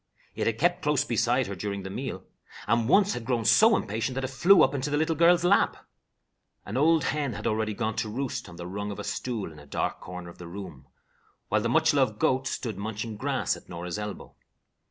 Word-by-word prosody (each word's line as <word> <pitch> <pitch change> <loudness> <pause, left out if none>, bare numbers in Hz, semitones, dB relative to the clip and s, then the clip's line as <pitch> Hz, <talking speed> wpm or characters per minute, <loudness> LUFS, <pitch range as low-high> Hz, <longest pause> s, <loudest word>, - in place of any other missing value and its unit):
It - - -2
had 115 -1 0
kept 175 +6 +2
close 150 -2 +1
beside 120 +1 +1
her 100 - -5
during 100 +1 -4
the 95 - -6
meal, 100 -5 -5 0.4
and 115 +2 +1
once 200 +3 +5
had 120 - -5
grown 115 -2 -1
so 220 - +6
impatient 110 +5 -3
that 135 - -2
it 130 - -3
flew 180 +8 +6
up - - +2
into 140 +1 -2
the 145 - 0
little 160 +1 +1
girl's 170 +2 +5
lap. 190 +3 +3 0.9
An 105 - -6
old 155 +3 +4
hen 145 -4 -1
had - - -7
already 110 -1 0
gone 110 +1 -2
to 110 - -1
roost 130 -3 -4
on 85 - -11
the 85 0 -7
rung 100 +3 -4
of 100 - -6
a - - -5
stool 115 -8 -3
in 75 - -13
a 75 - -15
dark - - -2
corner 90 -1 -8
of - - -19
the 90 - -8
room, 85 -7 -9 0.6
while - - +2
the - - -1
much - - +3
loved - - +2
goat 130 +1 +1
stood 110 -6 -4
munching 110 +1 -4
grass - - -1
at - - -15
Norah's 90 +2 -5
elbow. 105 -1 -7
115 Hz, 225 wpm, -27 LUFS, 100-140 Hz, 0.9 s, so